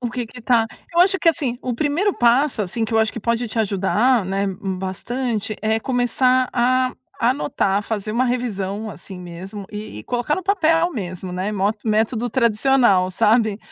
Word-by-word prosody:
O 240 -2 -3
que 245 0 -4
que 250 +3 -12
tá 230 -1 +3 0.3
eu 340 - +3
acho 385 +1 +4
que 335 - +3
assim, 275 -7 -2
o 250 -2 -2
primeiro 310 - +1
passo, 245 +2 +2
assim, 215 +5 -2
que 220 - -5
eu 225 - +3
acho 220 0 +2
que - - -6
pode 235 +2 -1
te 220 - -4
ajudar, 215 +4 +2
né, 195 +1 -1
bastante, 200 +4 -3
é 220 +1 +1
começar 255 +1 +1
a 255 +1 +2 0.3
anotar, 235 -5 +1
fazer 215 -1 -3
uma 250 +3 +2
revisão 215 -4 -2
assim 185 +1 -10
mesmo 185 +4 -8
e 210 - -7
e - - -12
colocar 245 +4 -1
no 375 - -4
papel 345 -3 +2
mesmo, 185 -4 -5
né. 185 +3 -2
Mo 200 0 +1
método 225 +2 +1
tradicional, 235 -5 +3
sabe? 215 +2 +2
230 Hz, 180 wpm, -21 LUFS, 200-255 Hz, 0.3 s, acho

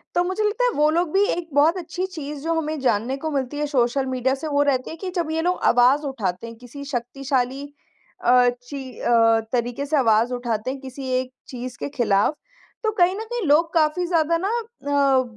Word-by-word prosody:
तो 350 - +3
मुझे 375 +4 -1
लगता 425 +4 0
है - - +3
वो 300 +1 +4
लोग 335 0 +1
भी 395 +1 +4
एक 345 -1 -2
बहुत 310 +6 +4
अच्छी 360 +2 -4
चीज़ 295 -1 -6
जो 330 0 0
हमें 310 -1 -3
जानने 255 +1 0
को 315 +3 -4
मिलती 275 0 -2
है 295 - 0
सोशल 265 -1 +1
मीडिया 260 0 0
से 315 +4 -6
वो 285 -1 +2
रहते 260 -3 0
हैं 325 - -7
कि 380 - -4
जब 330 -3 -1
ये 320 - 0
लोग 360 +2 0
आवाज़ 250 +4 +5
उठाते 210 -6 -3
हैं 230 - -9
किसी 250 +4 -10
शक्तिशाली 260 +1 -2 0.6
अ, 245 0 +6 0.2
ची 265 -2 -8
अ, 225 -1 +4
तरीके 245 +3 -1
से 300 +1 +1
आवाज़ 230 -1 +3
उठाते 240 -1 -2
हैं 270 - -6
किसी 265 0 -7
एक 255 0 -5 0.2
चीज़ 250 -1 -7
के - - -3
खिलाफ 210 +1 +2 0.5
तो 435 - +1
कहीं 370 -2 +3
न - - -5
कहीं 475 -8 -2
लोग 325 +4 +3
काफ़ी 320 +2 +2
ज़्यादा 335 -1 +2
ना - - +1
अ, 285 - +1
280 Hz, 210 wpm, -23 LUFS, 250-330 Hz, 0.6 s, अ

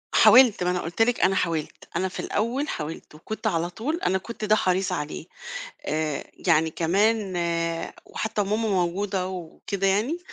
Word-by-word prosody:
حاولت 245 -8 +7
ما 180 - +2
أنا 180 - 0
قُلت 170 +7 -3
لِك 240 +1 +3
أنا 190 +1 +4
حاولت، 165 -4 -2
أنا 185 +2 +1
في 185 - -7
الأول 250 +8 -1
حاولت 150 0 -6
وكنت 220 +8 -5
على 170 -4 0
طول 275 - -3
أنا 190 +1 +3
كنت 220 +3 -6
ده 215 +1 +5
حريص 185 -1 +1
عليه، 150 +1 -4 0.6
آآ 155 -1 -1 0.2
يعني 160 +1 +4
كمان 195 +4 +1
آآ 170 -1 -1
وحتّى 220 -1 -3
وماما 215 +2 0
موجودة 185 +1 0
وكده 190 +2 -4
يعني، 220 - +1
190 Hz, 165 wpm, -25 LUFS, 170-215 Hz, 0.6 s, حاولت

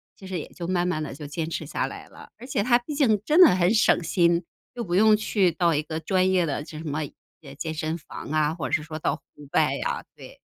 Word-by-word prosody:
其 195 - -13
实 185 -3 -3
也 - - -7
就 170 -1 -7
慢 180 -1 +1
慢 155 -4 -1
地 140 - -6
就 150 - -8
坚 160 +2 -3
持 160 - -4
下 - - -2
来 - - -9
了， - - -14
而 250 - -11
且 205 - 0
它 240 0 +5
毕 295 +5 -7
竟 225 -8 +3
真 315 +4 +5
的 335 - +9
很 185 +3 +3
省 215 - +4
心， 170 0 +2 0.3
又 240 - -3
不 175 -3 -4
用 215 +1 +6
去 200 -4 +2
到 170 0 +2
一 150 - +1
个 160 +1 -4
专 185 +3 +1
业 180 -2 +3
的 145 -1 -2
这 155 - -10
什 160 - -8
么 150 +1 -2 0.4
哎 135 -1 -10
健 160 0 -3
身 155 +1 -2
房 150 - -9
啊， 155 0 +2
或 135 -7 -4
者 - - -10
是 155 - +2
说 155 0 -7
到 - - -1
户 - - -33 0.3
外 - - +3
啊， - - -2
对。 - - -13
170 Hz, 285 characters per minute, -25 LUFS, 155-200 Hz, 0.4 s, 的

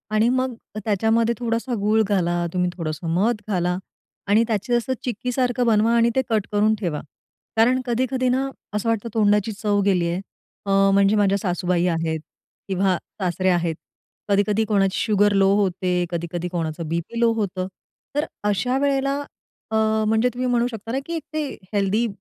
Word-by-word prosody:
आणि 220 +2 +4
मग 255 0 0 0.3
त्याच्यामध्ये 225 +3 +2
थोडासा 235 +1 -1
गूळ 215 +2 +3
घाला, 175 -3 +1
तुम्ही 180 -1 +1
थोडंसं 160 0 -4
मध 215 +3 +1
घाला 180 -3 0 0.5
आणि 215 +3 +4
त्याचे 225 +2 -1
असं 240 +2 0
चिक्कीसारखं 250 +1 -1
बनवा 225 +1 +3
आणि 235 0 +4
ते 265 - +4
कट 215 -3 +1
करून 210 +1 +3
ठेवा. 170 -7 -2 0.6
कारण 250 +3 +4
कधी-कधी 255 +1 0
ना, 260 +2 +1 0.3
असं 210 +2 -1
वाटतं 230 0 -1
तोंडाची 210 -1 +2
चव 205 -1 +2
गेली 180 -4 +2
आहे 180 +3 -2 0.4
अ, 195 0 +4
म्हणजे 200 +1 +4
माझ्या 200 -1 +3
सासूबाई 180 -2 0
आहेत 165 -1 -1 0.5
किंवा 190 -1 +1 0.2
सासरे 185 +1 +1
आहेत, 170 -2 +1 0.5
कधी-कधी 205 +2 +2
कोणाची 195 -3 +1
शुगर 205 -2 +3
लो 195 0 +4
होते, 180 -2 +1
कधी-कधी 170 +1 -3
कोणाचं 165 -2 -3
बी-पी 170 +8 -3
लो 235 -1 +4
होतं, 190 -4 -2 0.5
तर 295 - +1 0.2
अशा 250 +6 +1
वेळेला, 275 0 +1 0.5
अ, - - 0 0.3
म्हणजे 220 +3 +3
तुम्ही 255 +1 -2
म्हणू 240 0 +2
शकता 225 0 -7
ना, 265 - 0
की 335 - -5
एक 320 - -4
ते 310 -1 -1 0.3
हेल्थी 205 +3 +1
210 Hz, 160 wpm, -23 LUFS, 185-235 Hz, 0.6 s, आणि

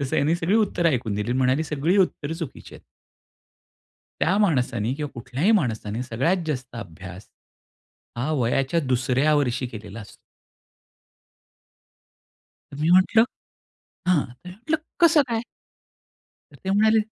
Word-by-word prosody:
तसं 140 -2 -3
त्यांनी 150 +4 +2
सगळी 170 +4 0
उत्तर 205 -6 +1
ऐकून 120 -9 0
दिली 105 +3 -2
आणि 125 - 0
म्हणाली 130 +4 +2
सगळी 155 +5 0
उत्तर 160 -5 0
चुकीची 165 -5 -8
आहेत. - - -14 1.4
त्या 185 +4 +2
माणसाने 125 - +1
किंवा 145 0 -5
कुठल्याही 125 - -1
माणसाने 115 - -1
सगळ्यात 135 +10 0
जास्त 130 -5 -4
अभ्यास, 95 -1 -9 0.9
हा 125 +6 -2
वयाच्या 135 +7 +1
2ऱ्या 130 +2 +1
वर्षी 130 -3 0
केलेला 110 -2 -9
असतो. 105 - -13 2.6
मी 150 +4 0
म्हंटलं, 185 +5 +5 0.8
हां 180 -3 +5 0.3
म्हटलं 220 - -2 0.2
कसं 330 -3 +6
काय? 230 0 -2 1.1
तर - - -15
ते 190 - -1
म्हणाले 220 +2 +4
140 Hz, 125 wpm, -24 LUFS, 120-180 Hz, 2.6 s, कसं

